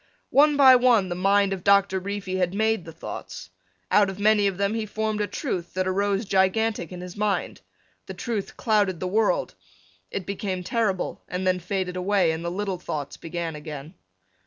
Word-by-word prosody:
One 295 +1 +5
by 265 -2 +8
one 240 -6 +3
the - - -1
mind 195 +2 +3
of 185 -2 -6
Doctor 200 -1 +4
Reefy 195 -1 -4
had 180 0 0
made 220 -3 +1
the 165 - -8
thoughts. 165 - -8 0.4
Out 205 -1 +5
of 190 - -6
many 210 0 +4
of 195 -2 -2
them 200 +1 0
he 225 -1 -2
formed 215 0 -2
a 205 - 0
truth 180 - -4
that 185 0 0
arose 200 +2 0
gigantic 195 0 +1
in 180 -1 -7
his 180 0 -8
mind. 205 -1 -1 0.5
The - - -7
truth 225 -5 -4
clouded 205 -6 +1
the - - -3
world. 205 0 +1 0.6
It 190 - -4
became 190 -1 -3
terrible 215 -3 -1
and 180 +1 -3
then 185 0 +2
faded 180 0 -3
away 185 -2 +2
and 160 +1 -4
the 170 - -2
little 190 0 -3
thoughts 145 -5 -5
began 165 -1 -5
again. 150 +1 -8
195 Hz, 185 wpm, -25 LUFS, 180-210 Hz, 0.6 s, by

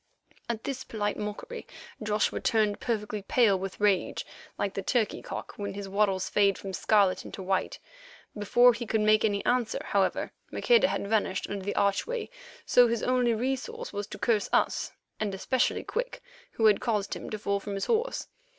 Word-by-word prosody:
At 225 -2 -3
this 260 -2 -4
polite 210 -2 -2
mockery 210 - -6 0.3
Joshua 210 0 0
turned 215 -2 +1
perfectly 210 -3 -2
pale 200 -1 +3
with 190 0 -6
rage, 205 -3 +1 0.3
like 200 -1 -1
the 195 - -3
turkey 220 +2 0
cock - - -6
when 200 -1 -4
his 200 -1 -5
wattles 195 -1 +1
fade 200 -2 +3
from 195 -1 -7
scarlet 200 -1 +3
into 190 - -8
white. 190 0 -1 0.6
Before 240 +4 +5
he 235 0 -5
could 220 0 +1
make 215 0 +4
any 205 -2 0
answer, 245 -2 +1
however, 195 -2 0 0.2
Maqueda 480 -1 +4
had - - -2
vanished 200 -3 0
under 200 -1 -4
the 205 - -2
archway, 435 - 0 0.3
so 245 -1 +6
his 235 -1 -1
only 250 -2 +2
resource 270 - -3
was 205 0 -3
to - - -8
curse 215 -4 +1
us, - - +1 0.3
and 205 -3 -1
especially 250 +6 0
Quick, - - -4 0.3
who 225 - +1
had 210 -2 +5
caused 210 -4 -1
him - - -7
to 215 - -3
fall 200 -1 -1
from 200 0 -5
his 195 - -2
horse. 470 +2 0
210 Hz, 180 wpm, -28 LUFS, 200-240 Hz, 0.6 s, so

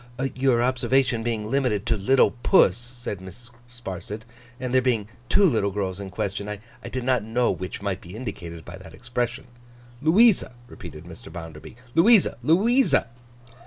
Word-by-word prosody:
'Your 130 -2 +2
observation 125 -1 +1
being 110 -2 -3
limited 125 -7 0
to 115 - +1
"little 120 +7 +3
puss,"' 90 - +5
said 120 -4 -6
Mrs. 115 +6 -12 0.2
Sparsit, 105 -3 -7 0.4
'and 125 -1 -4
there 130 - +5
being 115 -5 0 0.2
two 200 - +5
little 115 - +2
girls 95 -1 -3
in 100 -1 -6
question, 100 +2 -4
I 105 -1 -5 0.3
did 130 -1 -4
not 125 -2 +2
know 120 +3 +1
which 95 +2 -6
might 100 -2 -2
be 90 +3 -11
indicated 85 -8 -7
by 90 +2 -9
that 80 -4 -13
expression.' 120 +2 -3 0.6
'Louisa,' 180 - +4
repeated - - -10
Mr. - - -12
Bounderby. 80 +1 -9 0.2
'Louisa, 205 +4 +5
Louisa. 205 - +3
120 Hz, 155 wpm, -24 LUFS, 100-130 Hz, 0.6 s, puss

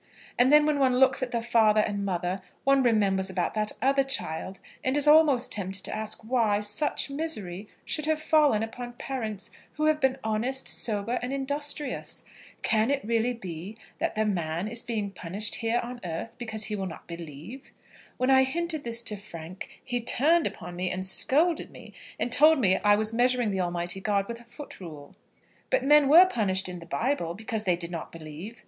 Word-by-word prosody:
And 250 +2 +5
then, 300 0 +7
when 300 -1 +1
one 255 -2 +3
looks 265 +1 +4
at 255 - -1
the 235 -1 -2
father 220 -2 +4
and 205 -1 -2
mother, 180 -1 -2 0.2
one 275 0 +4
remembers 200 -5 +2
about 180 -2 -2
that 215 -1 -1
other 275 +1 +3
child, 190 -8 -3 0.2
and 260 +2 +1
is 290 0 +5
almost 295 -5 +5
tempted 190 -1 -2
to - - -3
ask 220 +1 -3
why 220 -3 +1
such 210 +7 0
misery 215 - -3 0.2
should 305 -1 -2
have 315 -1 +1
fallen 300 -8 +3
upon 240 +2 -7
parents 225 -5 -5 0.2
who 305 - -1
have 310 0 +2
been 265 -1 +2
honest, 235 +5 -1
sober, 220 +2 -1
and 245 +1 -4
industrious. 285 +1 -2 0.4
Can 220 +1 +2
it 280 -5 -1
really 230 +2 +1
be 185 0 -8 0.2
that - - -1
the 215 0 +1
man 170 -2 -2
is 235 +2 -1
being 215 -4 -3
punished 195 +4 -3
here 230 +1 0
on 245 +1 -7
earth 175 +7 -5
because 220 -3 -1
he 215 - -2
will 195 -2 -3
not 165 - -10
believe? 170 - -9 0.5
When 255 +1 +2
I 265 0 +6
hinted 315 +2 -2
this 235 0 +1
to 215 - 0
Frank, 185 -3 -10
he 245 -1 -2
turned 310 +8 +3
upon 175 - -8
me, 180 +1 -2
and 185 +1 -4
scolded 310 - +2
me, - - -13 0.3
and 245 - -1
told 305 +4 +6
me 190 -8 +3
I 205 0 +4
was 215 +1 -1
measuring 245 -2 +2
the 190 -1 -1
Almighty 175 +1 -2
God 200 -1 0
with 235 0 -6
a - - -18
foot 280 +5 -11
rule. 150 -6 -10 0.5
But - - +1
men 295 -1 +5
were 340 +5 +9
punished 195 - 0
in 180 -1 -7
the 165 - -12
Bible 175 -6 -1
because 220 0 -4
they 180 -2 +3
did 170 0 -3
not 165 -2 -6
believe. 165 +8 -9
225 Hz, 195 wpm, -27 LUFS, 190-265 Hz, 0.5 s, were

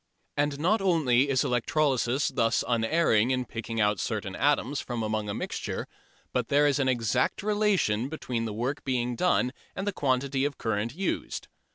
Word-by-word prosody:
And 145 -1 0
not 195 +8 +2
only 145 -8 +3
is 130 -2 +2
electrolysis 130 +1 +1
thus 115 -4 +1
unerring 115 -1 +2
in 130 -1 0
picking 115 0 -5
out 105 -2 +2
certain 100 -4 -3
atoms 145 +2 +1
from 120 -2 -4
among 110 -1 -2
a - - -1
mixture, - - -4 0.5
but - - 0
there 145 +1 +4
is 145 -1 +2
an 135 - +1
exact 125 - +1
relation 200 - +1
between 125 -7 -3
the 110 - -3
work 125 +7 -3
done 125 +2 +1 0.2
and 195 - -3
the 205 - -1
quantity 135 -2 0
of 145 -1 -1
current 115 +2 -2
used. 195 +3 -3
130 Hz, 165 wpm, -28 LUFS, 115-145 Hz, 0.5 s, there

